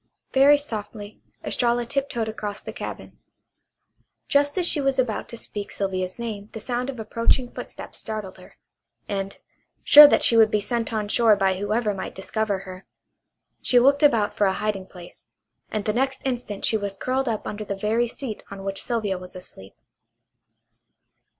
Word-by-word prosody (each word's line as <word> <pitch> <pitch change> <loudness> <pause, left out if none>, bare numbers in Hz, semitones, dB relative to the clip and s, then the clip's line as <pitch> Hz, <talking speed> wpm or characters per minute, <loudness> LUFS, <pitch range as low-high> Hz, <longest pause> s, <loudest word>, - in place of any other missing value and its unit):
Very 280 +2 +6
softly 215 -6 -8 0.2
Estralla 240 -1 0
tiptoed 240 -3 -2
across 210 -2 -5
the - - -8
cabin. - - -8 1.1
Just 285 +2 +2
as 360 - +2
she 310 -4 +3
was 270 -1 +1
about 245 -5 -1
to 235 - -7
speak 205 -2 -5
Sylvia's 185 -2 -3
name 215 -3 -6
the 220 - -6
sound 245 +3 -3
of 255 -4 -6
approaching 230 +3 0
footsteps - - -8
startled 210 -4 -6
her, 180 - -17 0.5
and, 195 -1 -4 0.5
sure 295 0 +11
that - - +3
she 230 - +5
would 220 -1 +6
be 210 - +1
sent 230 +2 -2
on 215 -2 -2
shore 225 0 +4
by 190 -2 +1
whoever 210 +1 0
might 190 - -6
discover 205 +1 -2
her, 185 -1 -11 0.7
she 250 - +3
looked 275 +3 +5
about 230 -9 +3
for 205 - +2
a 190 - +1
hiding 200 -2 -3
place, 175 -2 -14 0.4
and 215 -1 -3
the 215 - 0
next 265 +3 -1
instant 245 -6 -3
she 220 - +2
was 200 -2 -5
curled 260 +2 -1
up 220 -2 -3
under 210 +1 -5
the 200 -1 -4
very 220 +4 0
seat 235 -2 -6
on 195 -1 -8
which 195 0 -3
Sylvia 210 -6 -2
was 180 0 -10
asleep. 100 - -12
215 Hz, 170 wpm, -24 LUFS, 200-245 Hz, 1.1 s, sure